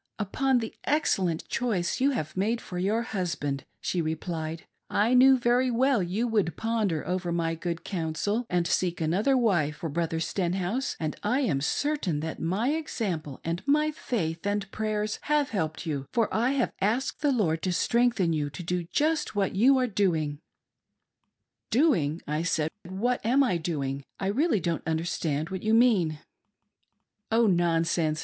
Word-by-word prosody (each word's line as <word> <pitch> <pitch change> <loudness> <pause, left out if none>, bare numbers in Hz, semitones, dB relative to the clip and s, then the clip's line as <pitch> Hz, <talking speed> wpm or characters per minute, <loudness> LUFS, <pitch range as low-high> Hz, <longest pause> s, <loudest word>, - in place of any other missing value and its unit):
" - - -58
Upon 260 +6 +1
the 225 -2 -3
excellent 190 - +1
choice 215 -6 -1
you 275 - +4
have 155 - -3
made 215 +5 0
for 180 -5 -6
your 210 +5 +1
hus 185 -8 -2
band," 140 -2 -3
she 175 - -1
replied; 160 0 -4
" - - -51
I 220 +4 +2
knew 260 +1 +7
very 245 +1 +2
well 250 -1 +2
you 195 +7 -1
would 210 -7 0
ponder 220 -8 -1
over 180 -1 -1
my 165 -1 0
good 170 +1 -4
counsel 195 +6 -2
and 175 -1 +1
seek 175 0 0
another 195 - +2
wife 175 - +2
for 165 - -5
Brother 165 +1 -1
Stenhouse, 185 +8 -1
and 155 -2 -2
I 250 +7 +1
am 150 - 0
certain 205 - 0
that 160 0 -5
my 190 +10 0
example 200 - -3
and 170 +1 -2
my 300 +2 +3
faith 170 - -3
and 205 -1 -1
prayers 215 0 -2
have 295 -1 +1
helped 160 -5 -2
you, 140 -4 -3
for 230 -3 +1
I 240 +5 +2
have 265 -3 0
asked 225 +7 0
the 290 - +3
Lord 165 -10 +1
to 185 - -1
strengthen 230 -3 +2
you 150 -2 -1
to 175 +5 -8
do 175 0 -2
just 300 - 0
what 195 -2 +1
you 260 +7 +5
are 255 - +2
doing." 165 -9 0 1.3
"Doing!" 180 - +2
I 150 +2 -1
said, 160 -2 0 0.2
"What 240 +7 -1
am 255 +5 +4
I 235 -10 +1
doing? 140 -5 -3 0.2
I 195 - -1
really 270 - +2
don't 170 -3 -2
understand 160 -1 -1
what 190 -1 -4
you 220 +1 +2
mean." 205 -10 +3 0.6
" 210 - -50
Oh 230 +1 +4
nonsense 165 -4 +2
190 Hz, 170 wpm, -27 LUFS, 165-235 Hz, 1.3 s, knew